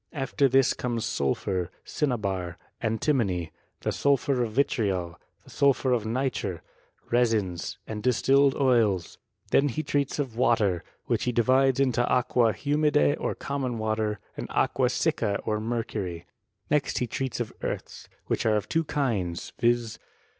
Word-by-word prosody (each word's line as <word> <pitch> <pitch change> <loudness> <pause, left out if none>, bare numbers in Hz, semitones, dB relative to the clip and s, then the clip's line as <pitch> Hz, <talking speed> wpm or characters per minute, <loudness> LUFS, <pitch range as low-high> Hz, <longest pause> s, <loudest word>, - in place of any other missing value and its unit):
After 140 -1 +1
this 135 0 +4
comes 120 -3 -2
sulphur, 90 - -1 0.2
cinnabar, 100 - -2 0.2
antimony, 110 - 0 0.3
the - - -1
sulphur 140 -2 +1
of 115 -3 -2
vitTJol, 100 -9 0 0.3
the - - -17
sulphur 140 -2 +2
of 110 -3 0
nitre, 115 -7 -2 0.5
resins, 110 -8 +1
and 105 -1 -5
distilled 135 +3 +3
oils. 115 -10 +2 0.3
Then 140 - +4
he 155 +5 -3
treats 145 -1 -1
of 135 -6 -3
water, 105 -7 +2 0.2
which - - 0
he 125 - +1
di 120 0 +2
vides 130 +1 +3
into 130 -3 +2
aqua 125 -2 +3
hwrnida 145 - +2
or - - -2
common 135 -4 -3
water, 110 -1 -1 0.2
and - - -5
aqua 125 -2 +1
sicca 120 -7 0
or 105 -1 -1
mercury. 110 -7 -3 0.5
Next 150 -1 +1
be 125 - 0
treats 130 +2 -3
of 120 -3 -3
earths, - - -5 0.2
which - - -1
are 110 - +3
of 105 - -1
Iwo 165 -1 0
kinds, 100 -12 -2
viz. 120 -2 +1
120 Hz, 145 wpm, -27 LUFS, 105-135 Hz, 0.5 s, this